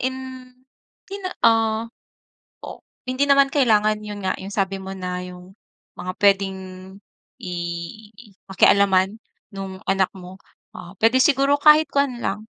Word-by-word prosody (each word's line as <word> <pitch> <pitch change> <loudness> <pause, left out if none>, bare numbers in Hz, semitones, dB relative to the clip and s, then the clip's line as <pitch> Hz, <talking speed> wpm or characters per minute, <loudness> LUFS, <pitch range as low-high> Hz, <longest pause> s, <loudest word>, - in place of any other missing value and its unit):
in 260 +1 -2 0.9
di 395 - -7
na, 370 - -4 0.2
ah 225 -1 +3 0.8
o - - -9 0.3
hindi 255 +2 +1
naman 275 0 +4
kailangan 215 -6 +2
yun 210 -1 -7
nga 185 - +1
yung 195 +1 -8
sabi 195 -1 -1
mo 190 0 -7
na 180 -1 -4
yung 180 +1 -12 0.4
mga 180 +1 -5
pwedeng 195 -2 +2 0.8
i 180 - -6 1.0
pakialaman 195 +1 +3 0.4
nung 195 -1 -7
anak 195 -1 +2
mo 185 +1 -12 0.4
o 175 +2 -11
pwede 230 +4 +4
siguro 280 +1 +3
kahit 305 0 +6
kuwan 280 -4 0
lang 200 +2 -2
205 Hz, 135 wpm, -22 LUFS, 190-260 Hz, 1.0 s, kahit